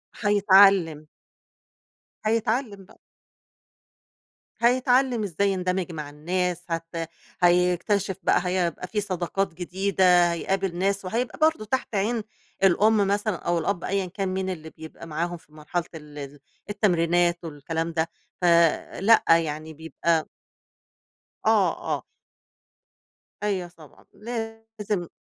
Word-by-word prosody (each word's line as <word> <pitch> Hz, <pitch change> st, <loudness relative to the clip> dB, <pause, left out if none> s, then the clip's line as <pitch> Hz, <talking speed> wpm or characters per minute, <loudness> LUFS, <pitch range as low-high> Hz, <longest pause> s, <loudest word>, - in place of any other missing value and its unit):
هيتعلِّم. 195 Hz, -6 st, +4 dB, 1.2 s
هيتعلِّم 220 Hz, -2 st, -1 dB
بقى. -, -, -21 dB, 1.6 s
هيتعلِّم 250 Hz, -1 st, +3 dB
إزاي 200 Hz, +1 st, 0 dB
يندمج 185 Hz, -1 st, -1 dB
مع 150 Hz, -3 st, -6 dB
الناس، 180 Hz, +3 st, -2 dB
هت 165 Hz, 0 st, -4 dB, 0.5 s
هيكتشف 180 Hz, +3 st, +2 dB
بقى -, -, +3 dB
هيبقى 180 Hz, -1 st, -1 dB
في 210 Hz, +1 st, -2 dB
صداقات 185 Hz, -1 st, -2 dB
جديدة، 180 Hz, -1 st, +2 dB
هيقابل 190 Hz, +1 st, -2 dB
ناس 195 Hz, +1 st, 0 dB
وهيبقى 235 Hz, +9 st, -3 dB
برضه 315 Hz, -8 st, +2 dB
تحت 235 Hz, -1 st, -2 dB
عين 215 Hz, +3 st, 0 dB, 0.4 s
الأم 210 Hz, +4 st, +4 dB
مثلًا 205 Hz, 0 st, 0 dB
أو 175 Hz, 0 st, -1 dB
الأب 175 Hz, +2 st, -2 dB
أيًا 195 Hz, 0 st, -1 dB
كان 190 Hz, +1 st, -3 dB
مين 190 Hz, 0 st, -2 dB
اللي 160 Hz, -3 st, -6 dB
بيبقى 160 Hz, +1 st, -11 dB
معاهم 170 Hz, +2 st, -3 dB
في 155 Hz, -, -25 dB
مرحلة 155 Hz, +3 st, -3 dB
ال 150 Hz, -1 st, -11 dB
ال 140 Hz, 0 st, -8 dB, 0.3 s
التمرينات 175 Hz, -3 st, +1 dB
والكلام 165 Hz, +2 st, -4 dB
ده 165 Hz, 0 st, 0 dB, 0.3 s
ف -, -, +1 dB, 0.5 s
لأ، 225 Hz, +3 st, +5 dB
يعني 160 Hz, -1 st, +2 dB
بيبقى 160 Hz, +1 st, -1 dB, 1.2 s
آه، -, -, +4 dB, 0.3 s
آه. -, -, -14 dB, 1.4 s
أيوه 190 Hz, -4 st, -1 dB
طبعًا. 160 Hz, -4 st, -18 dB
لازم. 225 Hz, -4 st, -5 dB
185 Hz, 110 wpm, -25 LUFS, 165-205 Hz, 1.6 s, لأ